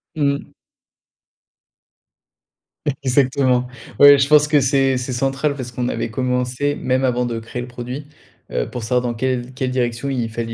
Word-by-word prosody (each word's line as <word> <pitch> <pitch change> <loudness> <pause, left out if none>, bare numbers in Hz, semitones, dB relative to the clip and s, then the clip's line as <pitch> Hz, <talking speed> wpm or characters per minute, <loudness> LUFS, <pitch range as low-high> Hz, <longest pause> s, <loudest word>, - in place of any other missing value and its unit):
Mmh. 140 -2 -1 2.5
Exactement, 130 -1 +2 0.3
ouais, 145 0 +9
je 135 0 +2
pense 150 -1 +6
que 150 -1 +3
c'est 135 0 +2
c'est 125 +1 -4
central, 135 +3 0
parce 125 -3 -6
qu'on 125 +1 -2
avait - - -2
commencé, 125 +3 -1
même 130 +1 0
avant 125 -1 +1
de 120 -1 -3
créer 115 +2 -6
le 125 - -6
produit, 125 +4 -7 0.4
heu, - - -2
pour 125 - -6
savoir 125 +2 +1
dans 120 -1 -2
quelle 125 +1 -2
quelle 130 0 -2
direction 120 +1 -1
il 120 -4 -2
fallait 115 0 -4
125 Hz, 160 wpm, -20 LUFS, 120-135 Hz, 2.5 s, ouais